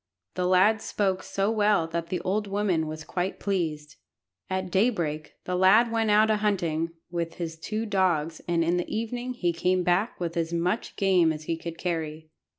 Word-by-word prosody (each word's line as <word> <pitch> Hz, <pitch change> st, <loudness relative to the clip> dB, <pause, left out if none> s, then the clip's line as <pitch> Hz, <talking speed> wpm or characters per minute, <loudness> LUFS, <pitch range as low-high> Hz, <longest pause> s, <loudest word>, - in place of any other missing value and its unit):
The 180 Hz, 0 st, -1 dB
lad 190 Hz, +4 st, +4 dB
spoke 190 Hz, -4 st, -1 dB
so 195 Hz, +2 st, -1 dB
well 210 Hz, -5 st, +3 dB
that 170 Hz, 0 st, -3 dB
the 180 Hz, -, -2 dB
old 205 Hz, +3 st, -1 dB
woman 195 Hz, -5 st, 0 dB
was 155 Hz, 0 st, -6 dB
quite 180 Hz, +3 st, -3 dB
pleased. 155 Hz, -6 st, -2 dB, 0.5 s
At 185 Hz, -1 st, -2 dB
daybreak 170 Hz, -8 st, 0 dB
the 180 Hz, -, -2 dB
lad 205 Hz, +6 st, +5 dB
went 225 Hz, -1 st, +1 dB
out 215 Hz, +1 st, +5 dB
a 215 Hz, -, +3 dB
hunting 170 Hz, -6 st, 0 dB, 0.2 s
with 170 Hz, -1 st, -3 dB
his 165 Hz, -2 st, -4 dB
two 215 Hz, +6 st, -3 dB
dogs, 175 Hz, -6 st, 0 dB
and 170 Hz, -1 st, +2 dB
in 170 Hz, +2 st, +1 dB
the 175 Hz, -, -2 dB
evening 245 Hz, +3 st, -3 dB
he 175 Hz, -7 st, 0 dB
came 180 Hz, +2 st, +1 dB
back 180 Hz, +6 st, +1 dB
with 170 Hz, -1 st, -3 dB
as 165 Hz, 0 st, -1 dB
much 175 Hz, +5 st, -1 dB
game 185 Hz, -4 st, +3 dB
as 155 Hz, 0 st, -5 dB
he 165 Hz, -, -1 dB
could 165 Hz, 0 st, -7 dB
carry. 160 Hz, -3 st, -4 dB
180 Hz, 185 wpm, -27 LUFS, 165-205 Hz, 0.5 s, lad